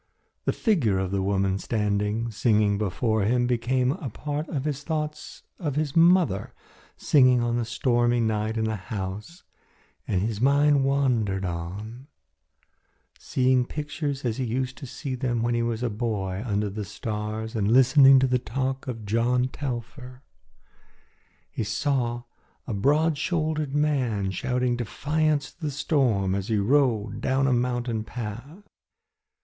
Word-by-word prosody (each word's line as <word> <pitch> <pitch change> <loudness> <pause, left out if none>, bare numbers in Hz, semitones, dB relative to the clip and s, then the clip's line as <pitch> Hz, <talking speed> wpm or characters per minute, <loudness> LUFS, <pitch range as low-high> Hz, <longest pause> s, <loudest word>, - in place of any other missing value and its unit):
The - - +2
figure 145 - +1
of 95 -1 -2
the 100 -1 0
woman 95 0 0
standing 105 +2 -1
singing 105 -2 +2
before 110 +2 0
him 120 +5 +2
became 125 +1 +1
a 150 -4 -5
part 150 +7 -4
of 140 -3 -3
his 145 -2 -2
thoughts 150 -1 -4 0.2
of 150 -6 -2
his 150 -2 -1
mother 165 - +3 0.4
singing 130 -4 +4
on 120 0 0
the 120 - -1
stormy 120 +1 +1
night 110 0 0
in 110 - 0
the 110 0 -1
house 105 - -6 0.6
and 95 -1 0
his 110 -1 -2
mind 140 +1 +4
wandered 120 -9 +1
on, 100 +9 -6 1.1
seeing 130 -1 +2
pictures 145 0 -4
as 115 -2 -1
he 130 - -1
used 125 +2 -2
to 135 - -7
see 135 +2 -5
them 120 -2 -1
when 120 0 +1
a 120 - +1 0.3
boy 105 -4 -2
walking 110 +1 -5
under 105 0 0
the 105 +1 -4
stars 110 +1 -5
and 105 -1 +1
listening 135 +2 +7
to 130 - +4
the 125 -1 +1
talk 130 +4 -3
of 115 -4 -5
John 120 +4 +1
Telfer. 130 0 -6 1.3
He - - -3
saw 120 -1 -1 0.4
a 120 - -4
broad 145 +8 +2
shouldered 155 -4 -1
man 125 -10 0
shouting 125 +3 -1
defiance 150 +5 -1
to - - -32
the 155 - -1
storm 130 - +1
as 100 0 -2
he 110 - +1
rode 115 -1 +1
down 135 +1 +1
a 135 - +3
mountain 120 -2 -1
path. 125 - -7
120 Hz, 145 wpm, -25 LUFS, 110-140 Hz, 1.3 s, listening